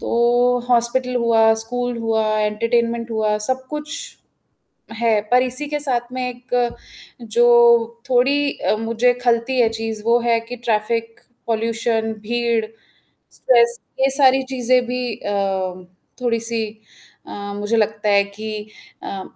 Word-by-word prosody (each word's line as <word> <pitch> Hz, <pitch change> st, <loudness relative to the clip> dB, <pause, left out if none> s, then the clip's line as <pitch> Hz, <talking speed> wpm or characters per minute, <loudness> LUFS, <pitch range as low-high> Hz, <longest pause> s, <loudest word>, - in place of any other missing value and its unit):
तो -, -, -5 dB, 0.6 s
हॉस्पिटल 250 Hz, +1 st, +1 dB
हुआ, 225 Hz, -2 st, +4 dB
स्कूल 245 Hz, +1 st, -3 dB
हुआ, 225 Hz, -1 st, 0 dB, 0.2 s
एंटरटेनमेंट 230 Hz, +2 st, 0 dB
हुआ, 215 Hz, -1 st, 0 dB
सब 260 Hz, +2 st, -1 dB
कुछ 300 Hz, 0 st, -5 dB, 1.1 s
है, 225 Hz, -2 st, +3 dB
पर 250 Hz, -, +5 dB
इसी 255 Hz, +3 st, -2 dB
के 295 Hz, 0 st, -2 dB
साथ 245 Hz, -4 st, -2 dB
में 255 Hz, -, -3 dB
एक 245 Hz, 0 st, -5 dB, 0.7 s
जो 230 Hz, +1 st, +1 dB, 0.7 s
थोड़ी 275 Hz, +3 st, +2 dB, 0.2 s
मुझे 230 Hz, +2 st, +2 dB
खलती 240 Hz, +2 st, +1 dB
है 235 Hz, -, +5 dB
चीज़ 225 Hz, -1 st, -4 dB
वो 235 Hz, +1 st, +3 dB
है 235 Hz, -1 st, +2 dB
कि 245 Hz, -, -4 dB
ट्रैफिक, 230 Hz, -1 st, -2 dB, 0.3 s
पॉल्यूशन, 225 Hz, 0 st, -1 dB
भीड़, 235 Hz, 0 st, 0 dB, 0.7 s
स्ट्रेस 235 Hz, -1 st, +3 dB, 0.2 s
ये 270 Hz, 0 st, +3 dB
सारी 265 Hz, -1 st, +5 dB
चीज़ें 250 Hz, 0 st, +3 dB
भी 250 Hz, +1 st, -3 dB
अ, 205 Hz, -, -5 dB, 0.9 s
थोड़ी 230 Hz, -2 st, 0 dB
सी 230 Hz, -1 st, -1 dB, 0.6 s
अ, -, -, -8 dB, 0.2 s
मुझे 210 Hz, +3 st, -1 dB
लगता 215 Hz, -1 st, 0 dB
है 200 Hz, -1 st, +4 dB
कि 215 Hz, +2 st, -7 dB, 0.5 s
अ, 195 Hz, -1 st, -5 dB
235 Hz, 130 wpm, -20 LUFS, 225-250 Hz, 1.1 s, पर